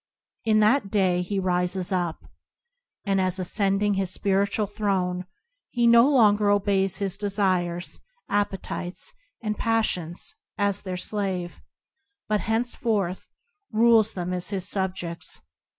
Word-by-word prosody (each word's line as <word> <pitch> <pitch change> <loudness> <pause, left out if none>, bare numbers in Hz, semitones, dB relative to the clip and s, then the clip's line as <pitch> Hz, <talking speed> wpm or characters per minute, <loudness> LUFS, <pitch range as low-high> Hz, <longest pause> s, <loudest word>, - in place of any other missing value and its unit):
In 215 -1 +4
that 215 0 +3
day, 185 -3 +2
he 195 +3 -3
rises 180 0 0
up, 175 -3 -1 0.8
and, 195 -1 +2
as 185 -1 0
cending 200 +1 +1
his 195 -2 -1
spiritual 200 +2 +1
throne, 185 -3 -1 0.4
he 240 -1 +1
no 235 +3 +7
longer 210 -6 +4
obeys 195 -2 +2
his 200 -1 -2
desires, 185 -4 0 0.3
appetites, 195 -3 -2 0.3
and 210 -1 -2
passions 185 -7 0 0.2
as 200 -1 +1
their 185 -2 -4
slave, 185 -3 -3 0.7
but 210 0 +1
henceforth 220 -5 -1 0.4
rules 225 -1 +4
them 180 0 -3
as 180 -1 -2
his 195 -2 -1
subjects. 185 -3 -2
195 Hz, 120 wpm, -25 LUFS, 185-210 Hz, 0.8 s, no